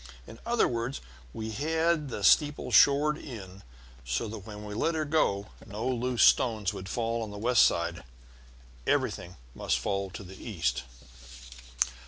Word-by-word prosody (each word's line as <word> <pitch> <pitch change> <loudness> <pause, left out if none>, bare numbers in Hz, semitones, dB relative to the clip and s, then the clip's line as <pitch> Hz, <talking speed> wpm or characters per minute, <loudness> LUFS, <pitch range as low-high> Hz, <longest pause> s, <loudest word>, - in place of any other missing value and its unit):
In 115 - -12
other 240 0 +3
words, 120 +3 -3 0.3
we 110 - -5
had 160 +4 0
the 105 - -5
steeple 150 +7 +4
shored 145 +2 +5
in 100 -7 -9 0.4
so - - -2
that 105 -2 -8
when 105 -1 -8
we 105 - -6
let 165 +10 0
her 155 -1 -1
go 105 -10 +1
no 110 +2 -5
loose 125 -3 +1
stones 110 -5 +4
could 95 +1 -7
fall 115 0 -1
on 110 - -4
the 105 - -8
west 120 +3 +3
side; 85 +1 +2 0.8
everything 90 +1 0 0.2
must - - 0
fall 100 -1 -2
to 95 +3 -8
the 95 0 -11
east. 75 - -2
110 Hz, 155 wpm, -29 LUFS, 100-135 Hz, 0.8 s, shored